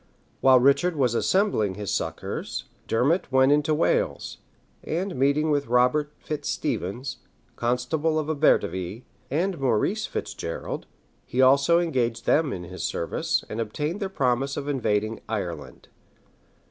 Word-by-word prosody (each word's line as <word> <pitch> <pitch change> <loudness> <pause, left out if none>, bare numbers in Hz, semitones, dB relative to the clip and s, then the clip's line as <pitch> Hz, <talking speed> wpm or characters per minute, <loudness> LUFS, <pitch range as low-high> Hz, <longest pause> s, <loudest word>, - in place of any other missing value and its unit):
While 130 -1 +6
Richard 140 +7 +3
was 130 -5 +2
assembling 120 - +1
his 100 -1 -3
succors, - - -3 0.2
Dermot 140 +8 +1
went 130 +1 +5
into 150 +1 +3
Wales; 160 - 0 0.4
and 180 +4 -2
meeting 140 +4 +2
with 145 -2 0
Robert 125 +5 +2
Fitz 150 -1 -5
Stephens, 120 +8 -3 0.4
constable 125 +7 0
of 155 -1 -1
Abertivi, 115 - +1 0.3
and 170 +4 -1
Maurice 135 - +1
Fitz 100 - -4
Gerald 85 -4 -5 0.4
he 125 - -5
also 140 +5 +5
engaged 120 -9 -1
them 150 -3 +3
in 90 -5 -5
his 90 +1 -8
service, 85 - -1
and 110 - -3
obtained 150 - -3
their 195 -3 -2
promise 135 -4 0
of 145 0 -4
invading 110 -5 0
Ireland. 85 -9 -5
135 Hz, 135 wpm, -25 LUFS, 115-155 Hz, 0.4 s, While